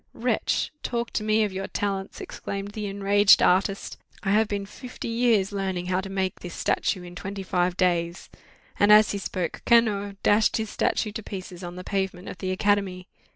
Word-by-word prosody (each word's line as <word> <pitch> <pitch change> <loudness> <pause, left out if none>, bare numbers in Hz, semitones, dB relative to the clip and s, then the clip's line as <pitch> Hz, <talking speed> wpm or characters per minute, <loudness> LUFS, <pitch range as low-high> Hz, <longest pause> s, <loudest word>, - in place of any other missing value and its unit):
'Wretch! - - 0
talk 235 -1 -2
to 215 - -2
me 215 +1 +3
of 205 -2 -2
your 195 +1 -4
talents!' 195 -1 -3
exclaimed 200 0 -6
the 210 0 -4
enraged 200 +1 +5
artist; 195 +2 +1 0.2
'I 195 - 0
have 215 +1 +4
been 200 -1 -3
fifty 245 +5 -8
years 230 -4 +2
learning 190 -3 -2 0.2
to 195 - -7
make 190 -1 -2
this 175 -2 -8
statue 185 -4 0
in 175 0 -10
twenty 195 +2 -6
five 180 -1 0
days!' 175 -2 0 0.5
And 205 +1 +5
as 210 0 +7
he 200 - -2
spoke, 185 -2 -4
Cano 205 -4 +3
dashed 210 +1 +4
his 220 -1 -3
statue 215 - 0
to 215 - -5
pieces 185 -3 -8
on 175 0 -6
the 180 - -7
pavement 190 -1 -3
of - - -9
the 185 - -3
academy. 185 -1 0
195 Hz, 185 wpm, -25 LUFS, 185-210 Hz, 0.5 s, as